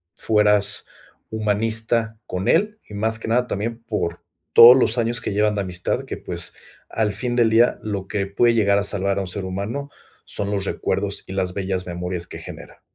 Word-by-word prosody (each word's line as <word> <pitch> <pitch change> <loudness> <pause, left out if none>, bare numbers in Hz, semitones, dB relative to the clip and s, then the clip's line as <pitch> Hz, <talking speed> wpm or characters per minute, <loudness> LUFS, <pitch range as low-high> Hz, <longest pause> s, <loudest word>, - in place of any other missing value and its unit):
fueras 105 -2 +2 0.5
humanista 110 +1 0
con 90 +1 -3
él, 210 +1 +2
y - - -12
más 110 +2 0
que - - -6
nada 125 +2 +1
también 115 +3 -3
por 105 -7 -3 0.3
todos 120 +2 +10
los 120 -2 +3
años 120 +1 0
que 115 - -4
llevan 105 +1 +2
de 100 - 0
amistad 90 -2 -2
que, - - -5
pues, - - -7 0.4
al 110 -2 0
fin 120 +4 0
del 115 -2 +4
día, 115 +2 +4
lo 100 -4 -4
que 100 -1 -1
puede 115 +4 +3
llegar 100 -3 +3
a 100 - +1
salvar 100 -1 -1
a - - 0
un 95 - -4
ser 95 +2 -4
humano 100 +10 -4 0.4
son 100 0 -3
los 100 -1 -1
recuerdos - - -2
y 95 - -6
las 95 -2 -1
bellas 95 -1 -2
memorias 90 0 -4
que - - -8
genera. - - -11
105 Hz, 195 wpm, -22 LUFS, 95-115 Hz, 0.5 s, todos